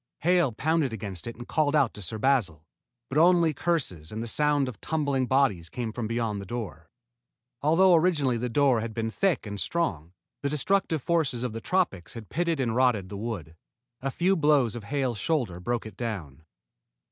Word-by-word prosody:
Hale 175 -4 +3
pounded 145 +2 0
against 100 -5 -6
it 115 - -5
and 120 +1 -10
called 155 -1 +1
out 140 -6 +3
to 105 - -10
Sir 95 +4 -4
Basil, 105 - +1 0.4
but 135 +5 0
only 170 -1 +5
curses 130 - -2
and 110 +1 -4
the - - -4
sound 145 +2 +2
of 125 - -8
tumbling 140 -5 0
bodies 125 -12 +2
came 120 -3 -4
from 115 0 -3
beyond 115 -3 -2
the - - -8
door. 90 -9 -6 0.7
Although 175 +5 +5
originally 155 -7 +3
the 125 +2 -2
door 130 -2 +3
had 110 -1 -5
been 115 -1 -2
thick 190 - 0
and 100 -1 -4
strong, 90 - -1 0.3
the 140 - -1
destructive 160 0 0
forces 155 -8 0
of 125 -3 -3
the 115 - -5
tropics 150 - -1
had 115 -3 -9
pitted 170 -3 0
and 115 -4 0
rotted 120 -7 +2
the 100 - -7
wood. 100 -8 -5 0.5
A 135 - -1
few 180 +7 +1
blows 145 - +3
of 115 -4 -7
Hale's 130 -4 -1
shoulder 120 - -1
broke 120 +5 -2
it 105 -3 -10
down. 90 - -5
125 Hz, 190 wpm, -27 LUFS, 110-150 Hz, 0.7 s, only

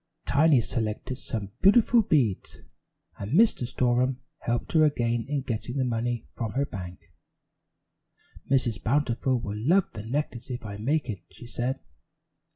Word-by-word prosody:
Tiny 145 -2 +4
selected 115 +3 -3
some 105 -5 -5
beautiful 230 +4 +6
beads, 135 - 0 0.6
and 100 +6 -4
Mr. 195 - +4
Storem 125 +1 +1 0.2
helped 120 0 -2
her 160 -1 +5
again 120 -5 +1
in 145 -2 -1
getting 120 +1 -3
the 130 - +1
money 120 0 -2
from 115 -3 -4
her 140 +2 +1
bank. 90 -2 -9 1.4
"Mrs. 120 -7 +1
Bountiful 130 0 +1
will 105 -2 -5
love 180 +5 +3
the 105 - -6
necklace 125 0 -3
if 120 -3 -5
I 100 -1 -6
make 140 +6 0
it," 105 -5 -4
she - - -13
said. 120 0 -3
120 Hz, 145 wpm, -27 LUFS, 115-140 Hz, 1.4 s, beautiful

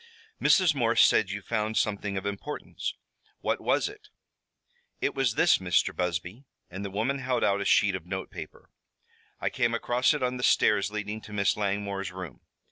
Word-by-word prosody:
"Mrs. 185 -5 +5
Morse 115 -4 +4
says 110 -4 +3
you 100 0 -5
found 110 0 -1
something 100 -1 -1
of 95 - -4
importance. 100 +9 -4 0.5
What - - -1
was - - +1
it?" 420 +1 -12 0.9
"It - - 0
was 130 -4 0
this, - - +4
Mr. 90 -2 +1
Busby," 90 - -3 0.3
and 95 +3 -6
the 100 - -4
woman 115 +8 -1
held 125 -2 -1
out 100 0 +2
a - - -2
sheet 100 0 +4
of 90 -2 -6
note 95 +1 -5
paper. - - -10 0.7
"I - - -1
came - - +1
across 125 +5 +2
it 145 - -3
on 125 0 0
the 125 - -5
stairs 105 -4 +3
leading 105 +1 -4
to 105 - -11
Miss 100 -2 +2
Langmore's 100 -1 -2
room. 90 -7 -8
105 Hz, 180 wpm, -28 LUFS, 95-120 Hz, 0.9 s, Mrs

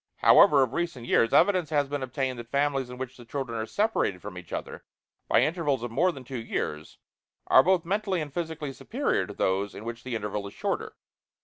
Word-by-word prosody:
However, 140 -2 +6
of 130 -1 -3
recent 170 -8 -3
years, 115 -1 +3
evidence 185 -6 +4
has 145 -3 +1
been 145 0 -3
obtained 130 -1 -2
that 120 0 -9
families 140 -1 0
in 125 - -8
which 130 0 -6
the 120 - -12
children 125 0 -4
are 110 - -3
separated 205 - 0
from 100 0 -8
each 90 -1 -10
other - - -5 0.4
by - - +4
intervals 150 -7 0
of 120 - -4
more 175 +10 +2
than 135 -6 -10
two 130 0 -6
years 75 -8 -4 0.5
are 130 - +7
both 180 +2 +2
mentally 195 0 0
and 150 -3 -5
physically 160 -4 -4
superior - - -1
to - - -8
those 95 +2 0
in 110 - -8
which 115 0 -6
the 130 -2 -4
interval 105 -2 -3
is 100 - -12
shorter. - - -3
130 Hz, 210 wpm, -27 LUFS, 115-155 Hz, 0.5 s, are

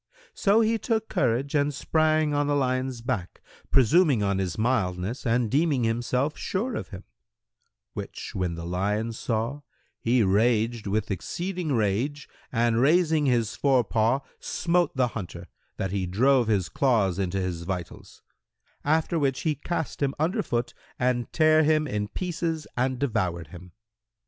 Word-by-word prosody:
So 210 +3 +3
he 225 0 +2
took 220 0 -1
courage 125 +4 0
and 145 0 +2
sprang 155 +2 +1
on 145 0 +1
the 145 - +1
lion's 130 -2 -1
back, 115 -7 -3 0.3
presuming 135 - +4
on 100 -1 +1
his 90 -4 -2
mildness 110 -1 -1
and 120 0 +2
deeming 145 -2 +2
himself 120 +5 0
sure 230 +7 -2
of - - -4
him; 95 -1 -9 0.9
which - - -7
when 90 -2 -2
the 85 0 -6
lion 105 +6 -1
saw, 115 +5 -2 0.4
he 120 0 +2
raged 110 +3 +2
with 105 +1 -1
exceeding 175 - -3
rage 120 +7 0 0.2
and 115 -1 +2
raising 155 0 +3
his 120 -3 +1
fore 135 -3 +3
paw, 115 +5 +1 0.2
smote 175 -1 0
the 125 -2 +2
hunter, 100 -7 -7 0.3
that 95 -1 -2
he 95 -2 -1
drove 125 +6 +3
his 100 -5 +1
claws 110 -9 +1
into 95 0 -1
his 90 -3 -3
vitals; 90 -1 -7 0.6
after 160 +3 +1
which 135 -3 0
he 155 - +1
cast 160 +2 -4
him 140 -1 0
under 175 +9 0
foot 120 -9 -2 0.2
and 125 -1 0
tare 155 -1 +4
him 155 0 +3
in 105 -6 -2
pieces 165 - -3
and 130 +1 0
devoured 90 - -1
him. 90 +1 -12
125 Hz, 150 wpm, -26 LUFS, 105-150 Hz, 0.9 s, presuming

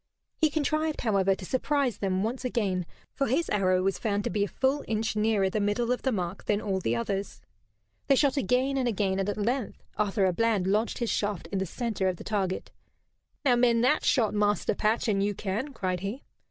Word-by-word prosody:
He 315 - +2
contrived, 310 +1 0
however, 195 -4 +2
to 185 - -9
surprise 265 0 0
them 190 -1 0
once 245 +4 -3
again, 195 -8 -1 0.3
for 275 - 0
his 280 +8 0
arrow 185 -3 +2
was 195 0 0
found 205 -2 0
to - - -2
be 205 +2 +1
a - - 0
full 270 +6 0
inch 220 0 -1
nearer 210 -2 +2
the 200 +3 -1
middle 205 +4 0
of 250 - 0
the 265 - 0
mark 185 -3 -3
than 205 -1 +1
all 195 -3 -1
the 120 -10 0
others. 195 +12 -3 0.7
They 275 - +5
shot 275 0 +3
again 265 +2 +1
and 255 -2 +1
again, 195 -4 0
and 195 +1 0
at 205 - -2
length 235 +3 -2
Arthur 205 -1 +1
à 185 -2 +2
Bland 225 -4 +2
lodged 210 +4 +1
his 235 -2 -1
shaft 205 -5 -1
in 195 - -1
the 190 - -2
center 220 -1 -2
of 185 -1 -1
the - - -9
target. 195 -3 -2 0.7
"Now 250 -3 +5
mend 240 -1 +3
that 260 +5 +3
shot, 230 -6 +2
Master 205 0 +1
Patch, 215 +4 0
an 200 -3 +2
you 205 0 0
can," 215 +10 -3
cried 185 -7 -2
he. 200 +9 -5
210 Hz, 215 wpm, -28 LUFS, 195-250 Hz, 0.7 s, They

